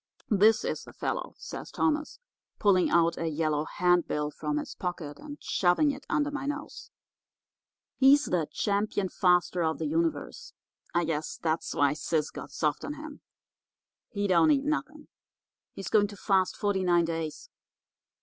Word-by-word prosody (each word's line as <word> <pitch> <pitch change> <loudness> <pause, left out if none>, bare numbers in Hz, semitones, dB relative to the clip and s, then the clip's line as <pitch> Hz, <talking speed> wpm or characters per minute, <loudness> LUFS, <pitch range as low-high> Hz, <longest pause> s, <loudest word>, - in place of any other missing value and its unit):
"'This 215 +2 +4
is - - -2
the - - -13
fellow,' - - -3
says - - -8
Thomas, 305 -1 -1 0.4
pulling 185 -3 +3
out 170 0 +3
a 165 - -1
yellow 155 -1 0
handbill 175 -5 +1
from 150 0 -3
his 150 - -4
pocket 170 -5 -5
and 295 -1 -9
shoving 185 +11 +2
it 275 +1 -10
under 295 0 +1
my 285 -1 -4
nose. 290 +1 -6 1.1
'He's 280 +2 +6
the 170 -4 0
Champion 205 -1 0
Faster 180 -1 +2
of 160 0 0
the - - -3
Universe. 330 +9 -2 0.4
I 175 - +1
guess 155 -1 -3
that's 160 0 -2
why 145 -1 +3
Sis 155 0 -1
got - - -8
soft 150 -2 -1
on 295 - -4
him. 300 -1 -10 0.9
He 205 -1 -2
don't 190 - +4
eat 280 -2 +3
nothing. 305 0 -3 0.7
He's 195 - -5
going 205 -2 +4
to 205 0 -11
fast 190 -1 +1
forty 200 -2 0
nine 175 -2 +3
days. 165 - -5
185 Hz, 155 wpm, -28 LUFS, -, 1.1 s, He's